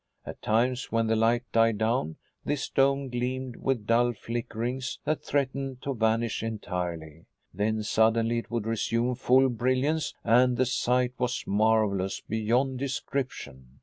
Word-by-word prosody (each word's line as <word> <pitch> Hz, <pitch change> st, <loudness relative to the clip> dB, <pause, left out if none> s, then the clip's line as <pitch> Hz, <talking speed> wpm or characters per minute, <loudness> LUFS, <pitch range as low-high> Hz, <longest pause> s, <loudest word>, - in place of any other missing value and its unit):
At -, -, -8 dB
times, 125 Hz, +4 st, 0 dB
when 115 Hz, 0 st, +2 dB
the 110 Hz, 0 st, +1 dB
light 115 Hz, +2 st, +2 dB
died 115 Hz, -1 st, +3 dB
down, 110 Hz, -7 st, 0 dB, 0.3 s
this 145 Hz, -2 st, -2 dB
dome 135 Hz, 0 st, +2 dB
gleamed 125 Hz, +1 st, -3 dB
with 130 Hz, -6 st, -1 dB
dull 120 Hz, +2 st, +3 dB
flickerings 120 Hz, +3 st, -4 dB
that 155 Hz, -, -1 dB
threatened 135 Hz, -2 st, -2 dB
to 140 Hz, -, -2 dB
vanish 115 Hz, -1 st, 0 dB
entirely. 90 Hz, -7 st, -5 dB, 0.3 s
Then 110 Hz, +1 st, -1 dB
suddenly 115 Hz, +2 st, +2 dB
it -, -, -9 dB
would 115 Hz, -2 st, -2 dB
resume 115 Hz, +2 st, 0 dB
full 130 Hz, +1 st, +4 dB
brilliance, 130 Hz, +6 st, 0 dB
and 125 Hz, +1 st, +4 dB
the 130 Hz, -, +3 dB
sight 125 Hz, 0 st, +1 dB
was 125 Hz, -1 st, -1 dB
marvelous 105 Hz, -2 st, +1 dB
beyond 120 Hz, +4 st, 0 dB
description. 120 Hz, -, -5 dB
120 Hz, 140 wpm, -27 LUFS, 110-130 Hz, 0.3 s, full